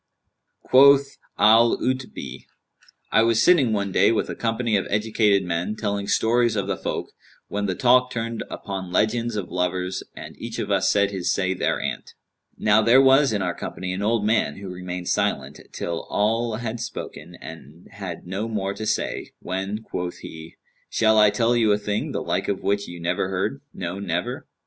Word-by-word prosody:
Quoth 140 Hz, +1 st, +5 dB, 0.2 s
Al 115 Hz, +3 st, +5 dB
'Utbν[FN#190], 125 Hz, -, -4 dB, 0.7 s
"I -, -, +5 dB
was 115 Hz, 0 st, +3 dB
sitting 140 Hz, -4 st, +5 dB
one 100 Hz, -2 st, -1 dB
day 95 Hz, +4 st, +4 dB
with 115 Hz, -, -1 dB
a -, -, -5 dB
company 115 Hz, -1 st, 0 dB
of 95 Hz, -, 0 dB
educated 105 Hz, -1 st, +2 dB
men, 90 Hz, +4 st, -2 dB
telling 100 Hz, -2 st, -2 dB
stories 120 Hz, +2 st, +2 dB
of 100 Hz, -2 st, -1 dB
the 100 Hz, -, -1 dB
folk, -, -, -4 dB, 0.4 s
when 100 Hz, 0 st, -2 dB
the 95 Hz, -, -1 dB
talk 125 Hz, +2 st, +4 dB
turned 115 Hz, -1 st, -4 dB
upon 95 Hz, -3 st, -6 dB
legends 115 Hz, +4 st, +1 dB
of 100 Hz, -4 st, -4 dB
lovers 90 Hz, +1 st, -1 dB
and -, -, -9 dB
each -, -, -6 dB
of -, -, -3 dB
us -, -, +2 dB
said 100 Hz, 0 st, +2 dB
his 95 Hz, -3 st, -1 dB
say 95 Hz, -1 st, 0 dB
thereanent. 90 Hz, -, -3 dB, 0.4 s
Now 105 Hz, +1 st, +4 dB
there 115 Hz, +4 st, +6 dB
was 135 Hz, 0 st, +5 dB
in 105 Hz, -3 st, -1 dB
our 90 Hz, -1 st, -1 dB
company 90 Hz, +1 st, -5 dB
an 95 Hz, -, -4 dB
old 105 Hz, 0 st, +1 dB
man, 105 Hz, -9 st, +1 dB
who 95 Hz, -1 st, -7 dB
remained 90 Hz, 0 st, -6 dB
silent, -, -, -1 dB
till 85 Hz, -1 st, -4 dB
all 115 Hz, +2 st, 0 dB
had 115 Hz, 0 st, -4 dB
spoken 85 Hz, -7 st, -7 dB
and 80 Hz, 0 st, -12 dB
had 95 Hz, -5 st, -7 dB
no 95 Hz, +5 st, -3 dB
more 100 Hz, -3 st, -2 dB
to 110 Hz, +1 st, -5 dB
say, -, -, -2 dB
when 95 Hz, +4 st, -4 dB
quoth 90 Hz, -4 st, -5 dB
he, 80 Hz, 0 st, -10 dB, 0.3 s
'Shall 110 Hz, -1 st, +3 dB
I 105 Hz, -1 st, +7 dB
tell 115 Hz, +2 st, +1 dB
you 115 Hz, -3 st, +3 dB
a -, -, +2 dB
thing, 105 Hz, 0 st, -2 dB
the -, -, -3 dB
like -, -, -1 dB
of 100 Hz, -, -2 dB
which 100 Hz, 0 st, 0 dB
you 85 Hz, 0 st, -8 dB
never 85 Hz, +2 st, -1 dB
heard; 100 Hz, +9 st, -2 dB
no, 90 Hz, +1 st, -5 dB
never?' 90 Hz, -3 st, -3 dB
105 Hz, 180 wpm, -23 LUFS, 95-115 Hz, 0.7 s, I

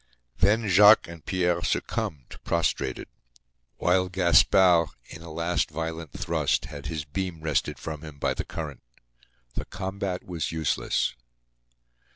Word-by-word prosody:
Then 110 Hz, +2 st, +3 dB
Jacques 105 Hz, +3 st, +7 dB
and 85 Hz, -1 st, -10 dB
Pierre 90 Hz, -2 st, 0 dB
succumbed, 85 Hz, -, -3 dB
prostrated; 85 Hz, -1 st, -1 dB, 0.7 s
while 90 Hz, +1 st, +2 dB
Gaspard, 90 Hz, -1 st, +5 dB, 0.2 s
in 80 Hz, -, -11 dB
a 85 Hz, -1 st, -9 dB
last 85 Hz, +2 st, 0 dB
violent 80 Hz, 0 st, -5 dB
thrust, -, -, 0 dB
had 70 Hz, -2 st, -8 dB
his 75 Hz, -2 st, -4 dB
beam 90 Hz, +1 st, -4 dB
wrested 80 Hz, -3 st, -1 dB
from 75 Hz, -2 st, -6 dB
him 75 Hz, -2 st, -10 dB
by -, -, 0 dB
the -, -, -3 dB
current. -, -, -6 dB, 0.7 s
The -, -, -4 dB
combat 95 Hz, -1 st, -4 dB
was 85 Hz, -4 st, -3 dB
useless. 80 Hz, -1 st, 0 dB
85 Hz, 130 wpm, -26 LUFS, 80-95 Hz, 0.7 s, Jacques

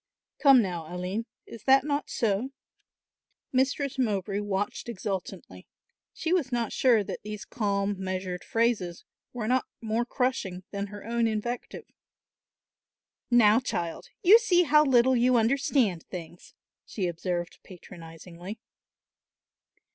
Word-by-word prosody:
Come 275 Hz, -5 st, +7 dB
now, 175 Hz, -4 st, -5 dB
Aline, 185 Hz, +6 st, -3 dB, 0.2 s
is 230 Hz, -, -12 dB
that 270 Hz, 0 st, +6 dB
not 290 Hz, 0 st, -2 dB
so?" 225 Hz, +3 st, 0 dB, 1.0 s
Mistress 270 Hz, +1 st, 0 dB
Mowbray 200 Hz, -4 st, 0 dB
watched 205 Hz, +2 st, -3 dB
exultantly. 195 Hz, -3 st, -6 dB, 0.4 s
She 330 Hz, -, -2 dB
was 305 Hz, -9 st, +1 dB
not 235 Hz, -3 st, -1 dB
sure 235 Hz, -5 st, +4 dB
that -, -, -6 dB
these 210 Hz, 0 st, -7 dB
calm 200 Hz, -3 st, -1 dB
measured 185 Hz, -1 st, -4 dB
phrases 225 Hz, -7 st, -1 dB, 0.3 s
were 235 Hz, -3 st, -4 dB
not 255 Hz, +2 st, +1 dB
more 225 Hz, +1 st, -1 dB
crushing 240 Hz, -8 st, -2 dB
than 200 Hz, 0 st, -3 dB
her 205 Hz, 0 st, -10 dB
own 235 Hz, 0 st, +1 dB
invective. 225 Hz, +3 st, -4 dB, 1.4 s
"Now, 230 Hz, -2 st, +6 dB
child, 170 Hz, -9 st, -4 dB
you 405 Hz, +5 st, +8 dB
see 360 Hz, -6 st, +3 dB
how 300 Hz, -1 st, +5 dB
little 260 Hz, -2 st, +4 dB
you 245 Hz, +1 st, +4 dB
understand 235 Hz, -, +2 dB
things," 175 Hz, -1 st, -10 dB, 0.3 s
she 195 Hz, -, -4 dB
observed 175 Hz, 0 st, -3 dB
patronisingly. 175 Hz, +2 st, -11 dB
220 Hz, 120 wpm, -27 LUFS, 190-255 Hz, 1.4 s, you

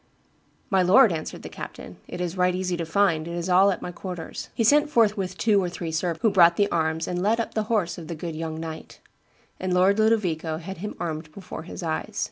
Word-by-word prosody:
'My 190 Hz, -1 st, +4 dB
lord,' 200 Hz, +5 st, +6 dB
answered 155 Hz, -2 st, -5 dB
the -, -, -6 dB
captain, -, -, -9 dB
'it 180 Hz, -, -7 dB
is 180 Hz, 0 st, -3 dB
right 180 Hz, -1 st, +2 dB
easy 185 Hz, -1 st, -1 dB
to 170 Hz, -1 st, -4 dB
find, 165 Hz, -3 st, +2 dB
it 170 Hz, -, -5 dB
is 175 Hz, +1 st, -3 dB
all 190 Hz, +2 st, +6 dB
at 190 Hz, -, -2 dB
my 180 Hz, -, -4 dB
quarters.' 175 Hz, -2 st, -7 dB
He 230 Hz, -, +1 dB
sent 295 Hz, +6 st, +4 dB
forthwith 205 Hz, -7 st, +1 dB
two 210 Hz, -3 st, +3 dB
or 180 Hz, -, -1 dB
three 175 Hz, -1 st, -5 dB
servants, 165 Hz, +4 st, -2 dB
who 220 Hz, -, +4 dB
brought 175 Hz, -3 st, +6 dB
the 205 Hz, +2 st, +2 dB
arms 160 Hz, -1 st, 0 dB
and 180 Hz, 0 st, -2 dB
led 215 Hz, +4 st, +2 dB
up 230 Hz, -, -3 dB
the 215 Hz, -1 st, -1 dB
horse 180 Hz, -7 st, 0 dB
of 165 Hz, -, -9 dB
the 170 Hz, -, -5 dB
good 165 Hz, 0 st, -5 dB
young 160 Hz, 0 st, -4 dB
knight; 160 Hz, -1 st, -8 dB, 0.6 s
and 185 Hz, 0 st, -2 dB
Lord 190 Hz, +3 st, +4 dB
Ludovico 180 Hz, -8 st, +1 dB
had 175 Hz, +2 st, -8 dB
him 210 Hz, +3 st, -5 dB
armed 155 Hz, -1 st, -4 dB
before 180 Hz, -1 st, -8 dB
his -, -, -7 dB
eyes. 170 Hz, +6 st, -3 dB
180 Hz, 230 wpm, -25 LUFS, 165-200 Hz, 0.6 s, lord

